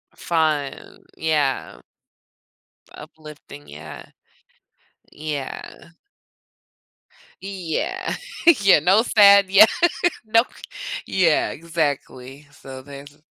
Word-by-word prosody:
Fun, 155 -4 -3
yeah. 150 -4 -1 1.1
Uplifting, 150 -2 -13
yeah. 75 +1 -11 1.1
Yeah. 150 +2 -7 1.5
Yeah. 200 - -4 0.5
Yeah, 195 -6 +5
no 190 +8 +3
sad. 200 -4 +5
Yeah 200 +3 +8 0.6
Nope. 230 +3 +1 0.5
Yeah, 175 -5 +1
exactly, 145 -4 -5
so 130 -2 -11
there's 145 +1 -13
155 Hz, 70 wpm, -21 LUFS, 145-195 Hz, 1.5 s, Yeah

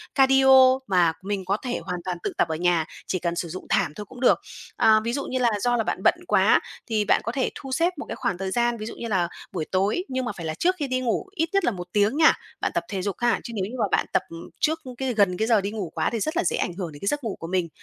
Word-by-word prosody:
cardio 265 -1 +6
mà 175 -4 +3
mình 195 0 -3
có 195 +3 +1
thể 245 +1 -3
hoàn 180 -1 -4
toàn 180 -1 -2
tự - - -2
tập - - +3
ở 160 - -2
nhà, 170 -1 +2 0.2
chỉ 185 - -1
cần 170 0 -2
sử 170 -1 -3
dụng 185 +3 -7
thảm - - +2
thôi 210 - -7
cũng 250 +5 -13
được. 255 - +5 0.4
À, 215 0 +5
ví 235 +1 -2
dụ 280 +1 -2
như 255 - -2
là 240 -2 +3
do 245 +3 +1
là 225 - +1
bạn - - -3
bận - - +5
quá - - +4 0.3
thì 215 -2 0
bạn - - +3
có 230 - -2
thể 260 +1 0
thu 270 - -8
xếp 335 +7 +1
một 290 - -6
cái - - -3
khoảng 190 -3 -2
thời 190 0 -3
gian, 240 +2 +1
ví 215 - -6
dụ - - -7
như 235 - -5
là 190 -5 +1 0.2
buổi 170 -5 -3
tối, 195 - +1
nhưng 260 -1 -2
mà 240 - -2
phải 170 - -6
là 155 - -2
trước 360 - +1
khi 285 - -1
đi 255 0 0
ngủ 245 +7 -1
ít 325 -1 0
nhất 390 -3 +2
là - - +2
1 180 -3 -7
tiếng 210 +6 +2
nha, 320 0 +7 0.3
bạn - - 0
tập - - 0
thể 195 -3 -3
dục 200 +1 -2
ha! 240 -1 +2
Chứ 235 - -7
nếu 190 -3 -1
như - - -7
mà 215 - +3
bạn - - +2
tập - - +3 0.4
trước 320 +1 +1 0.2
cái 265 -2 -1
gần 200 -5 +2
cái 220 - 0
giờ 220 -4 +4
đi 200 - -3
ngủ 200 -7 -5
quá - - +1
thì 230 - -3
rất 310 +9 -2
là - - +2
dễ 175 - +1
ảnh 175 - -1
hưởng 175 -3 -5
đến 145 - -12
cái 200 - -4
giấc 290 +4 0
ngủ 220 - -3
của 165 - -6
mình. 180 -1 0
215 Hz, 305 wpm, -25 LUFS, 185-255 Hz, 0.4 s, nha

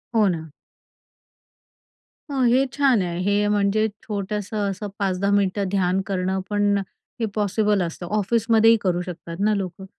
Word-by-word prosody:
हो 215 -2 +5
ना. 160 -4 -2 1.8
हो, 270 -2 -1
हे 250 +3 +4
छान 270 -7 +3
आहे. 175 -1 -3
हे 205 +1 +2
म्हणजे 210 +1 +2 0.2
छोटंसं 205 0 -3
असं 200 +2 -5
5-10 195 0 0
मिनिटं 200 0 +1
ध्यान 190 -1 +1
करणं 190 -1 -1
पण 205 -1 +2 0.4
हे 230 - +1
पॉसिबल 210 0 +1
असतं, 170 +1 -5
ऑफिसमध्येही 225 +2 +4
करू 180 -2 0
शकतात 170 -1 -7
ना 210 +2 +2
लोकं. 190 -1 -5
200 Hz, 140 wpm, -23 LUFS, 185-215 Hz, 1.8 s, हो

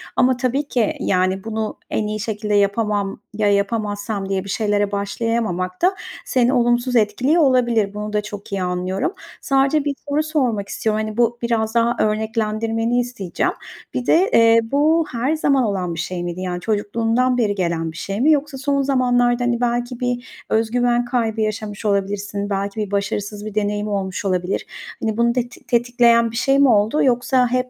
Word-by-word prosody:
Ama 255 0 +3
tabii 270 +3 -1
ki, 235 -6 +1
yani, 185 +1 0
"Bunu 220 -1 -3
en 210 - -1
iyi 215 0 -3
şekilde 210 -1 -3
yapamam. 205 0 0
Ya 210 -1 +1
yapamazsam." 205 -1 -1
diye 190 -1 -1
bir 200 - -9
şeylere 205 -1 0
başlayamamak 200 -3 -2
da 375 +2 +3 0.3
seni 250 +1 +2
olumsuz 240 +1 +2
etkiliyor 250 +10 +3
olabilir. 240 -7 +2
Bunu 210 0 -5
da 210 - +1
çok 205 -1 -9
iyi 195 - -2
anlıyorum. 180 - -2 0.3
Sadece 275 +2 +2
1 285 - 0 0.2
soru 300 +2 +1
sormak 250 -10 -1
istiyorum. 215 -1 -1
Hani, 215 +1 -5
bu 240 0 +2
biraz 225 -1 -1
daha 235 +1 +3
örneklendirmeni 225 +2 0
isteyeceğim. 240 -7 -2 0.4
Bir 250 - -2
de, 370 +5 +4
eee, 230 0 +6
bu 310 +3 +3
her 255 +6 0
zaman 275 -4 +2
olan 185 -5 -1
bir 165 - -6
şey 180 -1 -3
miydi? 175 +1 -4
Yani, 180 -1 -3
çocukluğundan 225 +4 0
beri 210 -4 +1
gelen 170 -3 -1
bir 160 - -12
şey 195 +6 -3
mi? 310 +3 +5
Yoksa 290 -2 0
son 280 +1 0
zamanlarda, 255 -2 +1 0.3
hani, 240 0 0
belki 240 +1 -1
bir 245 0 -4
öz 220 0 +1
güven 245 0 +2
kaybı 230 -3 -1
yaşamış 215 0 -3
olabilirsin, 200 0 -1
belki 200 +2 -2
bir 205 -2 -3
başarısız 205 +1 -2
bir 215 -1 -7
deneyim 210 0 -1
olmuş 195 -1 -3
olabilir. 185 -1 -1 0.4
Hani, 220 -1 -1
bunu 235 0 +3
teti 245 +1 -4
tetikleyen 235 -1 +3
bir 230 - -9
şey 270 +3 +2
mi 280 - +6
oldu 220 +5 +3
yoksa 250 0 +2
hep 255 0 0
225 Hz, 175 wpm, -20 LUFS, 205-245 Hz, 0.4 s, eee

